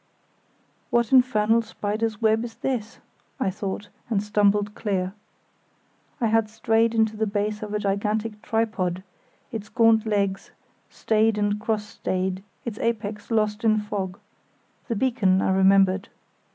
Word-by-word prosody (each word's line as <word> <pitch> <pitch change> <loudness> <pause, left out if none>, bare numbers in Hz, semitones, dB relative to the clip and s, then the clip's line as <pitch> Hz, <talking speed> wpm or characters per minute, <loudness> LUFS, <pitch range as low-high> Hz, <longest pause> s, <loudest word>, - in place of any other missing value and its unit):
"What 235 -2 +1
infernal 230 -3 +4
spider's 215 0 -3
web 220 0 +2
is 235 -1 -7
this?" 245 -3 -3 0.4
I 195 -7 +1
thought, 200 +1 -5 0.2
and 210 -3 +1
stumbled 210 -1 +2
clear. 190 -4 -2 1.1
I 240 - +1
had 225 -1 +2
strayed 225 +1 +1
into 220 -1 +2
the 220 0 0
base 210 +1 -2
of 210 -1 -5
a - - +2
gigantic 210 +2 -1
tripod, 205 -6 -1 0.5
its 215 -3 -6
gaunt 225 -2 +4
legs 200 -2 0 0.4
stayed 220 0 +1
and 205 0 0
cross 215 -1 -1
stayed, 185 -2 -2 0.2
its 225 -3 -5
apex 210 -2 -2
lost 215 -1 0
in 215 -1 +4
fog; 200 -3 -3 0.7
the 230 - -1
beacon, 210 -6 +2
I 190 - +1
remembered. 190 0 +4
210 Hz, 135 wpm, -24 LUFS, 200-225 Hz, 1.1 s, infernal